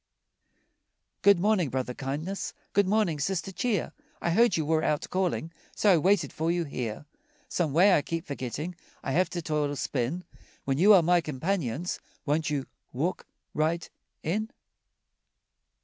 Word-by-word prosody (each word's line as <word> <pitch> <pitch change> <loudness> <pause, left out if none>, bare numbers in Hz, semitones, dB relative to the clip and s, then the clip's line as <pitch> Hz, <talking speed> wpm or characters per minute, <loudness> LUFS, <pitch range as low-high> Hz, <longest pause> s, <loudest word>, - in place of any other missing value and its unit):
Good 200 -3 +6
morning, 195 -5 +2
Brother 125 -1 -2
Kindness, 150 +10 -4 0.2
Good 200 -1 +3
morning, 195 -7 +2
Sister 185 +4 -1
Cheer, 215 +4 -1 0.3
I 170 - 0
heard 225 +1 +4
you 160 - 0
were 160 +1 +2
out 150 -1 0
calling, 180 -3 -1 0.2
So 205 - +4
I - - +5
waited 185 +3 +2
for 160 +1 -1
you 175 0 +1
here. 125 -4 -4 0.4
Some 165 -5 0
way, 180 +7 +6
I 150 - +4
keep 165 +3 -4
forgetting 140 +5 -4 0.3
I - - -2
have 180 +6 +2
to 175 -2 -4
toil 150 -2 0
or 145 - -3
spin 140 +6 -2 0.4
When 135 +1 0
you 200 +5 +7
are 180 - +6
my 175 +1 +4
companions, 160 - -2 0.3
Won't 155 +1 +1
you 140 -3 -1 0.3
walk 155 +9 -2 0.3
right 165 +2 0 0.4
in? 215 +7 -1
165 Hz, 155 wpm, -28 LUFS, 145-185 Hz, 0.4 s, you